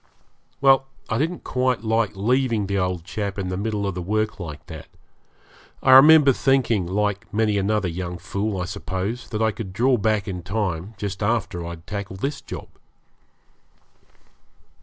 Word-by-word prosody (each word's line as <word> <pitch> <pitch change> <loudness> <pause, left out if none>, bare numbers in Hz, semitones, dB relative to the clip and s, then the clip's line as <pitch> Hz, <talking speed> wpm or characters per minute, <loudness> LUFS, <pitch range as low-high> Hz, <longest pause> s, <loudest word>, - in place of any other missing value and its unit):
Well, 135 -1 +5 0.2
I 115 - 0
didn't 165 +4 -2
quite 125 -2 0
like 110 -1 +1
leaving 115 +1 +1
the 100 0 -1
old 90 -2 -1
chap 100 +2 -4
in 95 -2 -3
the 90 - -2
middle 105 +1 -2
of 100 - -1
the 90 - -4
work 110 +4 -1
like 80 -5 -7
that. - - -9 1.0
I 130 - +5
remember 140 +1 +8
thinking, 120 -9 +2
like 105 +3 -1
many 105 -1 +1
another 100 0 +1
young 90 +1 -4
fool, 100 +2 -3
I 90 - -2
suppose, 100 +4 -4
that 110 -1 -1
I 110 - +3
could 100 -4 -7
draw 125 +5 +3
back 110 -2 0
in 90 -2 -4
time, 95 0 -3
just 100 -1 -4
after 100 -5 -1
I'd 85 0 -8
tackled 100 -1 -6
this 140 +1 -2
job. - - -8
105 Hz, 160 wpm, -23 LUFS, 95-115 Hz, 1.0 s, remember